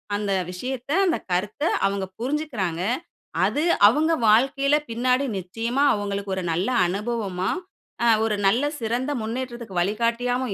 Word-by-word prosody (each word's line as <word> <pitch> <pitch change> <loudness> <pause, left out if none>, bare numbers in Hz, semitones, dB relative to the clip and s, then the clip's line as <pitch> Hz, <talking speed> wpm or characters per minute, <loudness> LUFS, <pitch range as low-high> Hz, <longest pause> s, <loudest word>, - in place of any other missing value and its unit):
"அந்த 205 -1 -2 0.2
விஷயத்த, 255 +8 -5
அந்த 335 - +2
கருத்த 195 +9 -1 0.2
அவங்க 195 -1 -2
புரிஞ்சுக்கறாங்க. 240 - -2 0.6
அது 295 - 0 0.3
அவங்க 305 +8 +3 0.2
வாழ்க்கையில 275 +5 +4
பின்னாடி 250 +4 +1
நிச்சயமா 230 +9 -1
அவங்களுக்கு 200 -1 -3
ஒரு 185 - -3
நல்ல 180 +7 0 0.2
அனுபவமா, 195 -1 -2 0.5
அ - - +4 0.2
ஒரு 215 -2 0
நல்ல 235 +8 +3 0.2
சிறந்த 240 +5 -1
முன்னேற்றத்துக்கு 235 -4 -4
வழிகாட்டியாவும் 235 +4 0
230 Hz, 120 wpm, -24 LUFS, 200-255 Hz, 0.6 s, வாழ்க்கையில